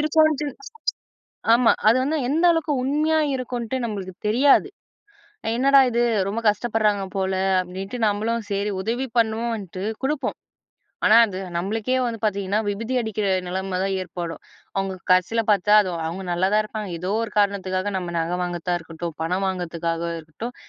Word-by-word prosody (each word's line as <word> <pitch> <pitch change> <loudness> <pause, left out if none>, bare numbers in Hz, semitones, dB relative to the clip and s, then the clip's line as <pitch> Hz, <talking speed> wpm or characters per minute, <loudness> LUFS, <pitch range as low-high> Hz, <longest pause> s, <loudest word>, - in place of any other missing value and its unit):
இருக்குன்னு 310 0 +3
சொல்லி 285 - -3 1.0
ஆமா, 235 -1 +5 0.2
அது 230 - +6
வந்து 310 +3 0
எந்த 320 +5 +1
அளவுக்கு 325 -2 +1
உண்மையா 305 +4 +2 0.2
இருக்குன்ட்டு 245 -1 -3
நம்மளுக்கு 195 -4 -5
தெரியாது. 275 - +4 0.9
என்னடா 275 +2 +6
இது 235 +1 +1 0.3
ரொம்ப 220 +3 -2
கஷ்டப்படுறாங்க 210 -2 +1
போல 190 0 0 0.3
அப்படின்ட்டு, 190 +6 -6
நம்மளும் 220 +3 -1
சரி 200 +1 0
உதவி 240 +6 -2
பண்ணுவோன்ட்டு 220 -5 -1 0.2
குடுப்போம். 285 +1 -1 0.7
ஆனா 220 - +7
அது 190 -3 -6 0.2
நம்மளுக்கே 215 +7 -1
வந்து 230 -1 -3
பார்த்தீங்கன்னா, 200 -1 0
விபுதி 225 +5 -3
அடிக்கிற 215 -3 -2 0.2
நிலைம 185 +1 -2
தான் 195 0 0
ஏற்படும். 170 -1 -6 0.3
அவுங்க 195 -1 -1 0.2
கடைசியில 185 +6 +2
பார்த்தா 205 0 +3
அது, 185 - -3 0.2
அவங்க 180 +4 -5
நல்லா 180 +2 +2
தான் 215 - +4
இருப்பாங்க. 215 -2 -5
ஏதோ 180 +2 -3
ஒரு 225 - -5
காரணத்துக்காக 200 -1 0
நம்ம 175 -2 -5
நகை 165 +2 -1
வாங்குறதா 175 0 -2
இருக்கட்டும், 165 0 -7
பணம் 180 +4 0
வாங்குறதுக்காக 170 -2 -3 0.2
இருக்கட்டும். 190 +10 -8
205 Hz, 145 wpm, -23 LUFS, 185-235 Hz, 1.0 s, ஆனா